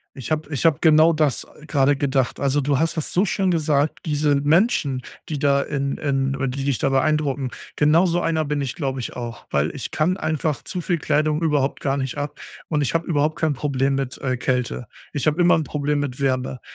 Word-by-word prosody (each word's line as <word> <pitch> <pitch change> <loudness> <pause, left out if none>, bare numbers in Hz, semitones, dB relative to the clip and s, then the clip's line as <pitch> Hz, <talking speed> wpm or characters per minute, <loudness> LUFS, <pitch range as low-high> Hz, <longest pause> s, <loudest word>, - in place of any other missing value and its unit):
Ich 135 +3 -4
habe 155 0 -3
ich 140 - -2
habe 160 -3 +3
genau 160 0 +6
das, 150 -5 +1 0.2
äh, 150 - -13
gerade 145 -2 +3
gedacht. 135 -2 0
Also, 140 +1 +2
du 140 -1 +1
hast 165 +2 0
das 160 - -3
so 185 +4 +3
schön 190 -1 0
gesagt, 150 -3 +1
diese 150 -1 +2
Menschen, 145 - +2 0.3
die 150 - -3
da 140 0 +3
in 140 -1 -2
in 135 -2 0
oder 135 0 -1
die 135 +2 -4
dich 140 -3 0
da - - +1
beeindrucken, 140 -1 +1 0.3
genauso 165 +4 +3
einer 160 -1 0
bin 145 0 -1
ich, 130 - -3
glaube 135 -4 -3
ich, 120 - -6
auch. 120 -1 -7
Weil 75 +2 +1
ich 130 - -5
kann 170 +4 +1
einfach 155 -3 -2
zu 180 - -4
viel 175 0 -1
Kleidung 155 +1 +1
überhaupt 145 -4 +1
gar 135 -1 0
nicht 130 0 -3
ab 145 0 -4 0.3
und 150 -2 0
ich 145 - -1
habe 165 0 0
überhaupt 155 -1 0
kein 160 -2 +1
Problem 135 0 0
mit, 135 -2 -3
äh, 130 -2 -1
Kälte. 125 -1 -1 0.3
Ich 145 - -2
habe 155 +3 +2
immer 175 0 +5
'n 160 - -1
Problem 150 0 -1
mit 140 -1 -4
Wärme. 130 -2 -1
145 Hz, 220 wpm, -22 LUFS, 135-155 Hz, 0.3 s, genau